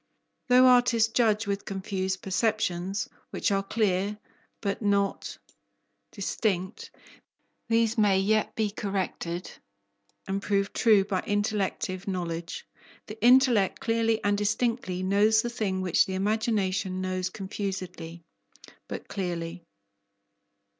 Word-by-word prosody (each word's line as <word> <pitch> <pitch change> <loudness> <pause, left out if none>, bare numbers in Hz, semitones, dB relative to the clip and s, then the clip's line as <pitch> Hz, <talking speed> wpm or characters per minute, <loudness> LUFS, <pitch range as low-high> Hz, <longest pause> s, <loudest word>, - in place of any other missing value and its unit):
Though 250 +1 +6
artists 245 -3 +4
judge 225 -2 +2
with 200 0 -2
confused 190 -1 -3
perceptions, 195 -2 -1 0.2
which - - -1
are 195 0 +2
clear 200 0 0 0.4
but 200 0 -3
not 200 -1 0 0.7
distinct, 190 -2 -2 0.8
these 225 0 +2
may 205 -3 +4
yet 215 +2 +1
be 215 -2 0
corrected 185 -4 -3 0.8
and 195 +1 -2
proved 200 0 0
true 215 -4 +4
by 195 -3 -1
intellective 205 -2 -1
knowledge. 170 -3 -4 0.4
The 215 0 -9
intellect 245 -5 +5
clearly 225 -1 +1
and 205 0 +2
distinctly 205 -2 -1
knows 210 +3 +3
the 240 - -3
thing 200 -5 -2
which 185 -2 +3
the 190 - -3
imagination 195 -2 0
knows 185 0 -2
confusedly 185 -4 -6 0.6
but - - -7
clearly. 175 -2 -4
200 Hz, 110 wpm, -27 LUFS, 185-220 Hz, 0.8 s, Though